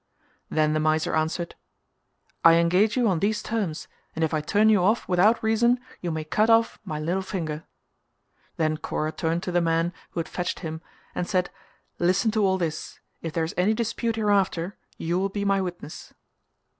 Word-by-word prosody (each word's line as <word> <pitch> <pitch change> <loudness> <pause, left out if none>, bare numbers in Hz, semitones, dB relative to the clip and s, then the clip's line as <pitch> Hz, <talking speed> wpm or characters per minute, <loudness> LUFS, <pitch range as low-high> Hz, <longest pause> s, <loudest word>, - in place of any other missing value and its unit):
Then 155 -1 +2
the 155 - +1
miser 155 0 +1
answered 160 +2 -1 0.9
"I 165 0 +8
engage 180 +7 +3
you 245 -2 +3
on 185 -5 +2
these 210 +3 0
terms 205 -9 -3 0.3
and 160 - -1
if 160 - 0
I 155 - +1
turn 205 +8 +3
you 215 -3 +5
off 215 +6 +2
without 200 +6 +3
reason 235 +3 +3 0.2
you 175 - -2
may 160 -1 -2
cut 180 +9 +1
off 230 0 +3
my 155 -7 -4
little 175 +5 -1
finger." 165 -5 -4 0.9
Then 155 -1 +1
Kora 155 0 -2
turned 165 +2 -1
to 180 - -3
the 175 0 +2
man 165 +1 +1 0.2
who - - -5
had 165 - -2
fetched 180 +2 -3
him 160 -2 -5 0.3
and 175 - -2
said 185 -2 0 0.5
"Listen 185 +5 +2
to 215 -1 +1
all 190 -1 +3
this: 160 -4 -4 0.2
if 165 -2 -5
there 165 - 0
is 160 - -3
any 195 +5 +2
dispute 230 0 -1
hereafter 200 -4 +1 0.2
you 170 +2 -1
will 195 +1 0
be 200 +1 -3
my 195 -1 +2
witness." 175 -4 -7
180 Hz, 185 wpm, -25 LUFS, 160-205 Hz, 0.9 s, I